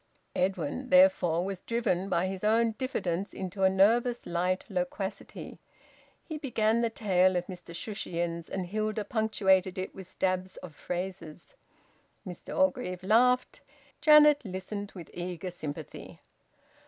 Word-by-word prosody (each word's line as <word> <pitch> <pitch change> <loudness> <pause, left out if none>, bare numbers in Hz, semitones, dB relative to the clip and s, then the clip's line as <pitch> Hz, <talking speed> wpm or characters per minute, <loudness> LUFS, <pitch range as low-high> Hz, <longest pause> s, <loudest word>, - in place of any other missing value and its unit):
Edwin, 185 - -1
therefore, 275 - +5
was 195 -2 -4
driven 205 -5 -1
by 170 +2 +1
his 190 0 -4
own 225 +2 +3
diffidence 200 -7 -3
into 190 +1 -5
a 190 - +6
nervous 230 +6 +3
light 180 +2 -1
loquacity. 195 +1 -5 0.6
He 315 -2 -6
began 230 -5 +1
the 230 - +1
tale 185 -4 +2
of 175 0 0
Mr 175 -2 -9
Shushions, 170 -5 -4
and 190 -1 -3
Hilda 215 +2 -2
punctuated 195 -5 +2
it 185 - -4
with 190 -2 -10
stabs 185 0 -2
of 175 -4 -10
phrases. 180 - -6 0.7
Mr 180 -3 -7
Orgreave 250 -10 0
laughed. 250 +5 +3 0.4
Janet 300 -2 +7
listened 200 +1 -5
with 175 -3 -10
eager 180 +1 -5
sympathy. 150 -4 -8
190 Hz, 130 wpm, -29 LUFS, 180-225 Hz, 0.7 s, Janet